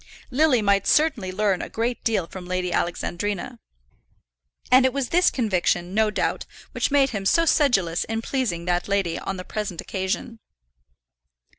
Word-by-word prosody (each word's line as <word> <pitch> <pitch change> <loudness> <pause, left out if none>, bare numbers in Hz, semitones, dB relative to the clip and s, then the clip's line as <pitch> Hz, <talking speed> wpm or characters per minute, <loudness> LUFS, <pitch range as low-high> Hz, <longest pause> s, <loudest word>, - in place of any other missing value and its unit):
Lily 260 -4 +3
might 200 -1 +2
certainly 270 -12 +2
learn 195 -1 0
a - - -6
great 235 +2 -2
deal 220 -6 +1
from 180 +1 -10
Lady 180 -1 -2
Alexandrina; 200 +7 -3 1.1
and 255 +1 +7
it 260 -1 +2
was 275 -3 -2
this 355 +2 +4
conviction, 185 -6 0
no 220 +1 +3
doubt, 210 - -2 0.2
which - - -1
made 275 -1 +3
him 200 -4 -3
so 330 +12 +3
sedulous 195 - +2
in 225 0 -3
pleasing 225 -12 -2
that 175 -1 0
lady 195 -4 0
on 195 - -4
the 185 - -6
present 210 -5 -4
occasion. 190 +4 -3
205 Hz, 155 wpm, -24 LUFS, 185-250 Hz, 1.1 s, and